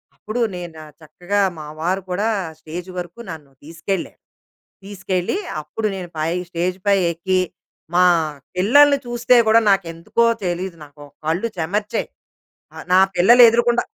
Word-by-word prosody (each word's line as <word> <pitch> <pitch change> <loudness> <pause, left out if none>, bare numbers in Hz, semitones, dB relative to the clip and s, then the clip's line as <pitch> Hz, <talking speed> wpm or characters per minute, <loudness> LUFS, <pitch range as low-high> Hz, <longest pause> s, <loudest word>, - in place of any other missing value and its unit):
అప్పుడు 220 +3 -4
నేన 175 -2 -8 0.3
చక్కగా 180 +6 -2 0.2
మా 155 - -7
వారు 185 +4 -1
కూడా 205 +5 0 0.3
స్టేజ్ 170 +3 -8
వరకు 175 +4 -7
నన్ను 155 -4 -9
తీసుకెళ్లారు. 165 +4 -5 0.6
తీసుకెళ్ళి 190 - -3 0.2
అప్పుడు 185 +9 -4
నేను 180 -2 -7
పై 155 +1 -1 0.2
స్టేజ్ 180 +1 -2
పై 200 -1 +5
ఎక్కి, 185 +3 0 0.5
మా 180 +1 +5 0.5
పిల్లల్ని 280 +10 +5
చూస్తే 240 +1 +2
గూడా 225 +1 +5
నాకెందుకో 175 +4 0 0.2
తెలీదు 175 0 -3
నాకు 145 0 -15 0.2
కళ్ళు 165 +8 0
చెమర్చాయి. 205 +6 -2 0.7
ఆహ్, - - -9
నా 185 - +7 0.2
పిల్లలు 235 +8 +7
ఎదురుగుండా 235 +1 +2
185 Hz, 130 wpm, -20 LUFS, 170-215 Hz, 0.7 s, నా